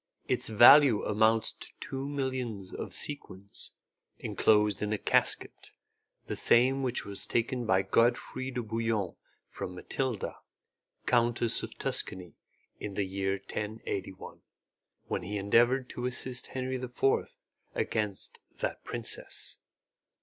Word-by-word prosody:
Its - - 0
value 120 +1 +8
amounts 110 +1 +3
to - - -11
two 135 +1 -5
millions 130 -8 -3
of - - -5
sequins, 100 -9 -3 0.4
enclosed 105 -1 +2
in 105 0 -1
a 110 - +1
casket, - - 0 0.5
the - - -4
same 130 +3 +3
which 125 -2 -1
was 100 -1 -1
taken 120 0 -1
by 95 -2 +3
Godfrey 125 +3 +1
de 125 -2 -3
Bouillon 110 -3 -1 0.3
from 90 - -7
Mathilda, 120 +3 -3 0.7
Countess 120 -1 +3
of - - -8
Tuscany, 90 -2 -1 0.5
in 100 -2 -6
the 100 - 0
year 95 0 -1
1081, 100 -1 -5 0.6
when - - -2
he 100 +4 -4
endeavoured 120 +6 +3
to 125 0 -3
assist 125 0 -1
Henry 130 0 -3
IV, 125 +1 0 0.4
against 105 -3 -2 0.2
that - - -3
princess. - - -1
115 Hz, 120 wpm, -30 LUFS, 100-125 Hz, 0.7 s, value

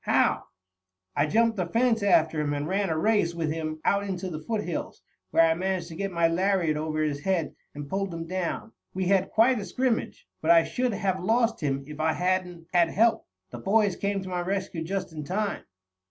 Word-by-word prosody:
"How?" - - +2 0.7
"I - - +2
jumped 225 +6 +2
the 180 -2 -1
fence 230 +3 +2
after 160 -6 +3
him, 145 -1 -1
and 145 +1 -3
ran 195 +1 0
a 160 - 0
race 190 -2 +2
with 160 -2 -1
him 155 -1 -4
out 200 0 +2
into 190 -2 -4
the 155 - -4
foothills, 210 -2 -4 0.3
where 165 - +5
I 165 - +3
managed 185 0 -2
to 165 - -8
get 195 +2 -3
my 170 -1 +3
lariat 175 -2 +1
over 155 0 -1
his 145 -2 -1
head 170 -2 -1 0.2
and 145 -1 -6
pulled 195 +3 -2
him 165 0 -5
down. 185 +5 -3 0.2
We 190 0 -1
had 195 -1 +3
quite 235 +2 +4
a - - -4
scrimmage, 235 +5 -2
but 160 - -2
I 170 -1 +7
should 250 +4 -1
have 190 -2 -1
lost 230 +3 +2
him 140 -3 -1
if 150 +1 -10
I 160 0 +2
hadn't 180 -2 -1
had 170 -2 +4
help. 225 +5 +2 0.2
The 120 - -7
boys 205 - +2
came 200 -1 -2
to 185 - -7
my 180 -1 -2
rescue 185 -2 -3
just 185 0 -3
in 155 -1 -5
time." 200 +6 -2
180 Hz, 210 wpm, -27 LUFS, 160-200 Hz, 0.7 s, I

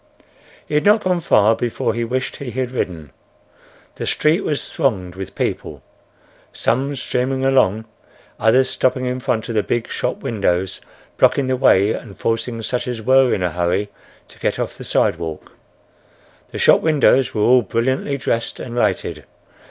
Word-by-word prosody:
He - - -9
had 150 - +2
not 210 +1 +4
gone 180 -1 +1
far 110 -6 +4
before 115 -1 -2
he 120 +1 -2
wished 130 +2 -3
he 140 - -6
had 125 0 -3
ridden. 85 - -4 0.9
The - - -4
street 160 +5 +2
was 150 -6 -2
thronged 100 - -1
with 95 0 -8
people: - - -3 0.7
some 140 +3 -1
streaming 130 +1 -1
along; 110 -5 +2 0.5
others 125 +5 +4
stopping 130 -1 0
in 125 0 -2
front 125 -4 -2
of 115 - -4
the 110 - +2
big 120 +2 -2
shop - - -3
windows, 95 -4 -1 0.4
blocking 140 - +3
the 130 0 0
way 110 -5 +4
and 100 -5 -8
forcing 115 0 -2
such 125 +3 -2
as 125 -2 -3
were 130 +3 +4
in 90 - 0
a 90 - 0
hurry 90 +4 -1 0.4
to - - -16
get - - -1
off - - -3
the - - -10
sidewalk. 80 -2 -1 0.9
The - - -7
shop - - +5
windows 145 -5 +3
were 105 - 0
all 125 +2 +5
brilliantly 130 +5 -1
dressed 115 -3 -2
and 120 -2 -7
lighted. 120 - -1
120 Hz, 165 wpm, -19 LUFS, 105-130 Hz, 0.9 s, shop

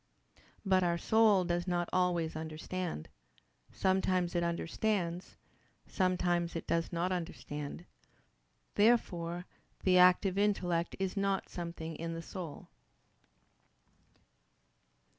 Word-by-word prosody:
But 190 -1 +4
our 170 -1 +1
soul 215 0 +4
does 175 0 -1
not 175 -1 0
always 175 -3 +1
understand: 160 - -4 0.6
sometimes 185 -2 +1
it 175 - +1
understands, 170 +1 -1 0.5
sometimes 175 -2 0
it 165 - -4
does 165 0 0
not 175 +2 -1
understand. 165 -3 -5 0.9
Therefore 175 -6 +2 0.4
the 185 -1 +5
active 185 +2 +5
intellect 180 -5 +1
is 190 0 -2
not 195 -1 0
something 170 -2 -6
in 165 0 -4
our 165 - -5
soul. 170 -6 -7
175 Hz, 100 wpm, -33 LUFS, 170-185 Hz, 0.9 s, the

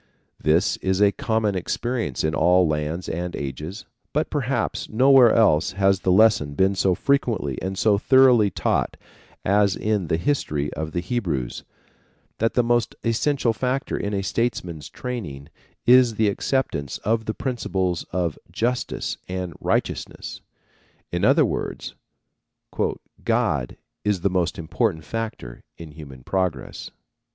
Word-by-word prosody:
This 80 +3 +2
is 95 0 -1
a 100 -1 +5
common 110 -5 0
experience 110 - -2
in 80 0 0
all 90 +2 +4
lands 75 +3 -2
and 90 +1 -3
ages; 75 - -6 0.3
but 150 +2 0
perhaps 130 -4 -1
nowhere 130 0 +6
else 90 -7 +3
has 95 0 +2
the 95 - +1
lesson 95 -8 +4
been 95 +3 +3
so 95 -1 +2
frequently 110 - 0
and 95 0 -3
so 100 0 +3
thoroughly 125 -4 +5
taught 85 - -1 0.5
as 100 0 +3
in 105 -5 -1
the 80 - +1
history 75 - -1
of 80 0 -5
the 85 - -1
Hebrews, 85 - -3 0.8
that 115 +1 +1
the 125 - +4
most 120 0 +1
essential 115 +1 +1
factor 130 +4 -2
in 100 - -2
a 95 - -1
statesman's 90 - -2
training 85 - -6 0.4
is 125 -2 +6
the 110 -1 +2
acceptance 100 - -1
of 110 +1 +1
the 110 - -3
principles 95 -9 -2
of 85 -3 -1
justice 120 +2 -2
and 90 -2 -4
righteousness. - - -2 0.7
In - - -2
other - - +5
words - - -4 1.3
"God - - 0 0.3
is 105 -4 0
the 100 - +1
most 90 -2 0
important 85 +1 -1
factor 110 - -5 0.2
in 80 -2 -10
human 70 -4 -11
progress." 90 -6 -2
95 Hz, 135 wpm, -23 LUFS, 85-115 Hz, 1.3 s, nowhere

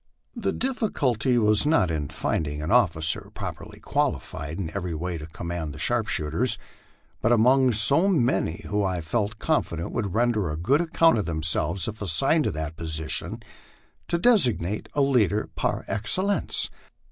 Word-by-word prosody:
The 235 - -1
diffi 250 -4 -1
culty 125 - +1
was 105 +3 +3
not 150 - +3
in 75 -3 -3
finding 75 -2 -2
an 75 - -3
officer 80 0 +2
properly - - -7
qualified 75 +3 -2
in 85 -5 -4
every 90 -4 -3
way 85 +1 -4
to 75 - -8
command 85 -2 -5
the - - -9
sharpshooters, 110 0 0 0.6
but, 115 - +2
among 125 +3 +4
so 140 - +4
many 120 - +1
who 105 0 0
I 90 -3 -1
felt 105 +5 -2
confident 85 - -1
would 105 -4 -3
render 110 -6 +1
a 75 - -4
good 130 - +2
account 165 -5 +3
of 105 - -2
themselves 80 +2 0
if 110 0 -6
assigned 135 - +2
to - - +1
that 80 +1 -5
position, 80 -2 -2 0.6
to 170 - 0
designate 125 - +2
a 145 - +2
leader 110 -7 +2
par - - -2
excellence. 185 - 0
105 Hz, 155 wpm, -25 LUFS, 80-130 Hz, 0.6 s, among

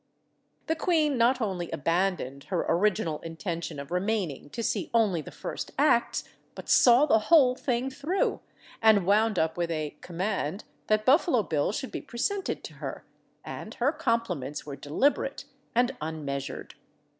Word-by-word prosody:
The 320 - 0
queen 315 -3 +2
not 245 +2 +3
only 185 -6 -2
abandoned 165 -3 -1
her 180 -3 -1
original 175 -3 +1
intention 165 -1 -5
of 140 +3 -8
remaining 180 -6 -1
to 230 - -5
see - - -1
only 205 -8 +3
the - - -10
first - - -6
acts, 280 -5 +3 0.3
but - - -9
saw 245 +3 +6
the 225 -7 +4
whole 285 -7 +7
thing 255 0 -1
through, 305 +8 -1 0.4
and 215 -4 +5
wound 210 +1 +3
up 160 0 +1
with 170 -1 -1
a 155 -3 -3
"command" 185 0 -3 0.2
that 215 0 +2
Buffalo 265 -3 +4
Bill 155 -3 0
should 265 +5 -4
be - - -4
presented 385 - -2
to - - -8
her, - - -6 0.4
and - - -7
her 255 +4 +2
compliments 230 - -2
were 145 -2 -6
deliberate 270 - 0 0.3
and 250 +2 +2
unmeasured. 145 -3 -5
210 Hz, 150 wpm, -28 LUFS, 165-250 Hz, 0.4 s, whole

